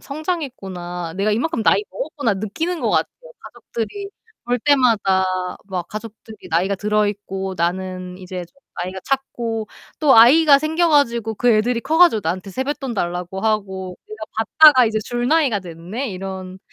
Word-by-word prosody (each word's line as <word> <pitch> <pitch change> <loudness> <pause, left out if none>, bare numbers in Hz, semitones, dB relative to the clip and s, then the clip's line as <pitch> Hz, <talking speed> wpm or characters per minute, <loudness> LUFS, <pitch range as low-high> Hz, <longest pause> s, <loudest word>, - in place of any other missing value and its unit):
성장했구나. 195 - -5
내가 205 +2 +1
이만큼 240 +3 -1
나이 415 - +3
먹었구나.' 290 - -2
느끼는 325 - -3
것 - - 0
같아요. - - +2 0.3
가족들이 395 - -6 0.4
볼 245 +1 0
때마다 225 -9 +3 0.4
막 180 -3 -4
가족들이 215 0 -10
나이가 180 +5 +1
들어 210 +2 +1
있고 195 -2 -4
나는 180 +1 -3
이제 185 -1 -6
좀 175 - -35 0.3
나이가 185 +2 -5
찼고 235 -5 -2 0.3
또 290 -6 +5
아이가 280 +5 +7
생겨 320 +3 +1
가지고 235 -7 +2
그 245 +4 0
애들이 230 +2 +2
커 310 +6 0
가지고 345 -11 +6
나한테 180 +4 -3
세뱃돈 265 +2 -3
달라고 180 +1 -3
하고' 190 -4 -2
내가 215 0 -7
받다가 260 +4 +6
이제 220 -1 0
줄 240 0 -2
나이가 285 -10 +2
됐네.' 180 +9 -6
이런 190 0 -7
215 Hz, 345 characters per minute, -20 LUFS, 190-270 Hz, 0.4 s, 아이가